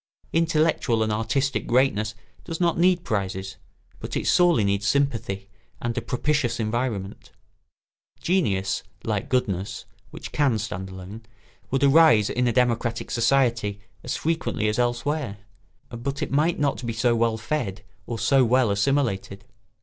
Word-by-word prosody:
Intellectual 155 Hz, -8 st, +2 dB
and 110 Hz, -, -1 dB
artistic 135 Hz, +6 st, -1 dB
greatness 110 Hz, -4 st, +2 dB, 0.3 s
does 165 Hz, -2 st, -5 dB
not 170 Hz, -2 st, +1 dB
need 180 Hz, 0 st, +3 dB
prizes, 95 Hz, -2 st, -3 dB, 0.4 s
but -, -, -4 dB
it -, -, -3 dB
sorely 175 Hz, -10 st, +4 dB
needs 100 Hz, 0 st, 0 dB
sympathy 115 Hz, -8 st, 0 dB, 0.3 s
and 120 Hz, 0 st, -3 dB
a 120 Hz, -, -1 dB
propitious 125 Hz, -1 st, 0 dB
environment. 110 Hz, -3 st, -3 dB, 0.9 s
Genius, 100 Hz, -, 0 dB, 0.2 s
like -, -, -2 dB
goodness 100 Hz, -7 st, -1 dB, 0.2 s
(which -, -, -9 dB
can 135 Hz, -6 st, +2 dB
stand 95 Hz, -3 st, -5 dB
alone), 95 Hz, +4 st, -9 dB, 0.5 s
would 135 Hz, +1 st, 0 dB
arise 140 Hz, -7 st, +6 dB
in 125 Hz, 0 st, +1 dB
a -, -, +2 dB
democratic 120 Hz, -1 st, 0 dB
society 115 Hz, -4 st, +1 dB, 0.2 s
as -, -, -3 dB
frequently 160 Hz, -9 st, -1 dB
as 105 Hz, +2 st, 0 dB
elsewhere; 120 Hz, 0 st, -1 dB, 0.5 s
but 135 Hz, +4 st, -4 dB
it -, -, -4 dB
might 155 Hz, +5 st, +2 dB
not 140 Hz, -3 st, -1 dB
be 115 Hz, -1 st, -2 dB
so 120 Hz, +1 st, +2 dB
well 115 Hz, -1 st, +1 dB
fed 110 Hz, -5 st, -3 dB, 0.2 s
or 120 Hz, -, -3 dB
so 130 Hz, +4 st, +3 dB
well 125 Hz, -2 st, +3 dB
assimilated. 100 Hz, -3 st, 0 dB
120 Hz, 140 wpm, -24 LUFS, 105-140 Hz, 0.9 s, arise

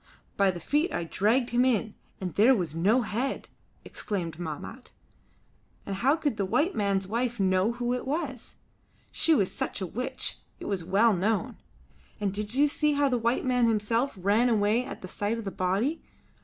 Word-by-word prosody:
"By 200 Hz, -1 st, +3 dB
the 180 Hz, -2 st, -3 dB
feet 300 Hz, -, 0 dB
I -, -, -2 dB
dragged 220 Hz, +9 st, +1 dB
him 240 Hz, +1 st, +3 dB
in, 225 Hz, -4 st, +1 dB, 0.3 s
and 185 Hz, -3 st, -4 dB
there 240 Hz, +6 st, +5 dB
was 175 Hz, -8 st, -2 dB
no 205 Hz, +10 st, +2 dB
head," 235 Hz, +6 st, -3 dB, 0.4 s
exclaimed 170 Hz, -6 st, -4 dB
Mahmat, 175 Hz, -, -7 dB, 0.9 s
"and 195 Hz, -1 st, -4 dB
how 265 Hz, +8 st, +3 dB
could 295 Hz, -8 st, -2 dB
the 200 Hz, -, 0 dB
white 310 Hz, -, +1 dB
man's 200 Hz, -2 st, 0 dB
wife 235 Hz, +3 st, -2 dB
know 190 Hz, +3 st, +2 dB
who 240 Hz, 0 st, -2 dB
it 250 Hz, +1 st, -4 dB
was? 275 Hz, -4 st, -4 dB, 0.6 s
She 325 Hz, -, +4 dB
was 195 Hz, -7 st, 0 dB
a 190 Hz, -, -2 dB
witch, 255 Hz, +8 st, -2 dB, 0.2 s
it -, -, -8 dB
was 195 Hz, -4 st, -2 dB
well 205 Hz, +6 st, +3 dB
known. 195 Hz, +1 st, -1 dB, 0.6 s
And 200 Hz, -2 st, -1 dB
did 210 Hz, +3 st, -3 dB
you 290 Hz, +2 st, +5 dB
see 300 Hz, +1 st, +1 dB
how 285 Hz, -1 st, +2 dB
the 250 Hz, -2 st, +1 dB
white 235 Hz, +3 st, 0 dB
man 250 Hz, -2 st, +3 dB
himself 230 Hz, +4 st, 0 dB
ran 205 Hz, +6 st, +2 dB
away 220 Hz, +2 st, +2 dB
at 270 Hz, -, -9 dB
the -, -, -5 dB
sight 205 Hz, +4 st, -2 dB
of 225 Hz, -, -6 dB
the 195 Hz, -, -3 dB
body? 195 Hz, -, -1 dB
225 Hz, 185 wpm, -28 LUFS, 195-255 Hz, 0.9 s, there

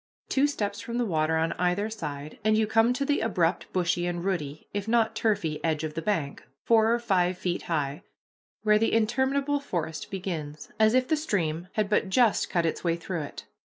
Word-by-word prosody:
Two 275 Hz, +2 st, +3 dB
steps 205 Hz, -7 st, -3 dB
from 235 Hz, 0 st, -4 dB
the 245 Hz, -, +1 dB
water 160 Hz, -4 st, +1 dB
on 160 Hz, +1 st, +1 dB
either 180 Hz, +4 st, +1 dB
side, 150 Hz, -9 st, -6 dB
and 215 Hz, 0 st, +3 dB
you 220 Hz, -, +3 dB
come 225 Hz, +2 st, +3 dB
to 275 Hz, +3 st, -1 dB
the 290 Hz, 0 st, +1 dB
abrupt, 180 Hz, -6 st, 0 dB
bushy, 175 Hz, -1 st, 0 dB
and 175 Hz, 0 st, -3 dB
rooty, 155 Hz, -6 st, -3 dB
if 205 Hz, 0 st, -3 dB
not 225 Hz, -1 st, +2 dB
turfy, 200 Hz, -10 st, 0 dB
edge 160 Hz, -2 st, 0 dB
of 155 Hz, -1 st, -3 dB
the 165 Hz, -, -3 dB
bank, 160 Hz, -8 st, -2 dB, 0.2 s
four 225 Hz, -1 st, +4 dB
or 235 Hz, -, +3 dB
five 185 Hz, -6 st, +1 dB
feet 180 Hz, -1 st, -2 dB
high, 150 Hz, -1 st, -1 dB, 0.6 s
where 210 Hz, -1 st, +4 dB
the 225 Hz, -, +1 dB
interminable 265 Hz, +6 st, +1 dB
forest 165 Hz, -, -4 dB
begins, 165 Hz, -6 st, -5 dB
as 220 Hz, +2 st, +5 dB
if 255 Hz, 0 st, +3 dB
the 315 Hz, -, +3 dB
stream 175 Hz, -, -1 dB
had 215 Hz, -2 st, +1 dB
but 205 Hz, -1 st, +1 dB
just 230 Hz, +1 st, +3 dB
cut 170 Hz, -2 st, +1 dB
its 165 Hz, -, -2 dB
way 170 Hz, -2 st, +2 dB
through 170 Hz, 0 st, -4 dB
it. 145 Hz, -, -8 dB
195 Hz, 200 wpm, -27 LUFS, 165-225 Hz, 0.6 s, as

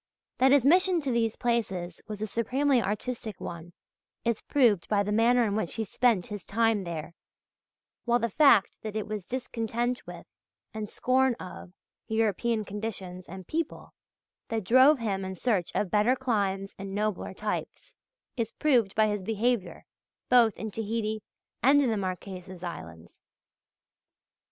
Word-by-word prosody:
That 265 Hz, +1 st, +5 dB
his 275 Hz, -3 st, +5 dB
mission 360 Hz, +3 st, +5 dB
to 275 Hz, -3 st, -2 dB
these 230 Hz, -2 st, +1 dB
places 195 Hz, -8 st, -2 dB
was 210 Hz, -1 st, -5 dB
a -, -, +1 dB
supremely 255 Hz, +5 st, +1 dB
artistic 215 Hz, +1 st, -4 dB
one 170 Hz, 0 st, -7 dB, 0.5 s
is 235 Hz, -2 st, 0 dB
proved 235 Hz, -, +2 dB
by 205 Hz, -1 st, +3 dB
the 205 Hz, -, -3 dB
manner 235 Hz, +3 st, +4 dB
in 205 Hz, -3 st, 0 dB
which 215 Hz, -6 st, -2 dB
he 225 Hz, -, -1 dB
spent 220 Hz, -3 st, +2 dB
his 205 Hz, -3 st, -7 dB
time 225 Hz, -2 st, +1 dB
there, 170 Hz, -1 st, -5 dB, 0.9 s
while 240 Hz, 0 st, +3 dB
the 235 Hz, -, 0 dB
fact 240 Hz, -6 st, +4 dB
that 215 Hz, -1 st, -6 dB
it 215 Hz, -, -2 dB
was 210 Hz, -4 st, -5 dB
discontent 240 Hz, -1 st, -2 dB
with, -, -, -9 dB, 0.5 s
and 215 Hz, -1 st, -5 dB
scorn 260 Hz, 0 st, +2 dB
of, 180 Hz, -3 st, -10 dB, 0.3 s
European 220 Hz, 0 st, 0 dB
conditions 195 Hz, -3 st, -6 dB
and 190 Hz, +1 st, -8 dB
people 325 Hz, -1 st, -4 dB, 0.5 s
that 225 Hz, -2 st, -2 dB
drove 260 Hz, +9 st, +6 dB
him 200 Hz, -5 st, -2 dB
in 190 Hz, 0 st, -5 dB
search 195 Hz, -4 st, 0 dB
of 200 Hz, -, 0 dB
better 215 Hz, +5 st, +3 dB
climes 200 Hz, -6 st, -1 dB
and 195 Hz, 0 st, -6 dB
nobler 210 Hz, -2 st, -2 dB
types, 210 Hz, +1 st, -4 dB, 0.4 s
is 230 Hz, -3 st, -2 dB
proved 245 Hz, -10 st, +2 dB
by 215 Hz, -, +4 dB
his 210 Hz, -2 st, -1 dB
behaviour 225 Hz, +1 st, -1 dB, 0.4 s
both 235 Hz, -4 st, +5 dB
in 220 Hz, -1 st, -5 dB
Tahiti 220 Hz, 0 st, -2 dB, 0.4 s
and 275 Hz, +3 st, +6 dB
in 265 Hz, -5 st, +2 dB
the -, -, +1 dB
Marquesas 185 Hz, -1 st, -5 dB
Islands. 85 Hz, -, -8 dB
220 Hz, 150 wpm, -28 LUFS, 195-240 Hz, 0.9 s, drove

